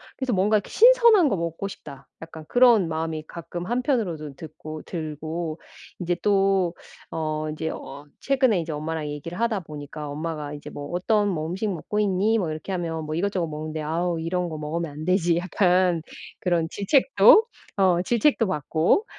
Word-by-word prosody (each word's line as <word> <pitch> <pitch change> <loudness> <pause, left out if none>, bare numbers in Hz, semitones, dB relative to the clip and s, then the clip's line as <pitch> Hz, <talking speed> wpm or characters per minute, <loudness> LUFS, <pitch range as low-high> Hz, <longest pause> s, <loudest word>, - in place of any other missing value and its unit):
그래서 260 -2 -2
'뭔가 205 +3 +3
이렇게 205 - -5
신선한 470 -7 +6
거 200 - 0
먹고 170 +3 -3
싶다.' 140 -8 -11
약간 160 -1 -10
그런 240 -7 +5
마음이 160 -1 -3
가끔 170 +1 -7
한편으로도 220 - -1
듣고 155 0 -9
들고 160 0 -5 0.4
인제 175 -1 -1
또 195 -3 +2 0.4
어 155 -1 -2
인제 160 +1 -3
어 145 -1 -8
최근에 260 -8 +2
이제 160 0 -5
엄마랑 155 +1 -3
얘기를 150 +6 -6
하다 230 -3 +1
보니까 150 -1 -8
엄마가 150 -1 -4
이제 145 - -8
"뭐 145 0 -7
어떤 205 +4 +1
뭐 160 -4 -2
음식 190 +6 -2
먹고 210 +5 -3
있니?" 205 +2 +2
뭐 170 -5 -1
이렇게 155 +5 -6
하면 165 -3 -3
"뭐 155 - -4
이것저것 185 -1 -1
먹는데." 155 0 -5
"아우. 165 +2 -1
이런 175 +2 -2
거 155 - -6
먹으면 160 +2 -3
안 150 +2 -8
되지." 180 -2 +2
약간 180 -1 +2 0.4
그런 170 -3 +1
질책도 260 - +5 0.3
어 185 -3 +3
질책도 235 +3 +2
받고. 165 - +1
170 Hz, 345 characters per minute, -24 LUFS, 155-200 Hz, 0.4 s, 신선한